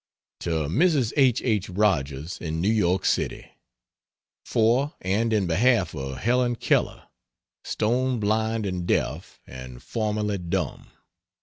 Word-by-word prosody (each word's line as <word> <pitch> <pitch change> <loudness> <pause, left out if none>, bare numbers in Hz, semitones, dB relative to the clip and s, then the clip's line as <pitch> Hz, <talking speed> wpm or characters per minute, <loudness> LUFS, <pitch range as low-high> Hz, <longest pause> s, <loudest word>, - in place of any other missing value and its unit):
To 80 -3 -1
Mrs. 140 - +2
H. 130 -4 +3
H. 105 -6 0
Rogers, 80 -6 0
in 80 -1 -3
New 95 +6 +2
York 95 -4 +1
City: - - -1 0.9
For 120 +6 +1
and 105 +5 0
in 105 -3 +2
behalf 115 +9 +2
of 65 -3 -5
Helen 120 +2 +1
Keller, - - 0 0.6
stone 125 +3 0
blind 110 +1 0
and 90 -2 -3
deaf, - - -1
and 65 -1 -10
formerly 105 -2 -2
dumb. 90 -2 -3
105 Hz, 120 wpm, -25 LUFS, 85-115 Hz, 0.9 s, H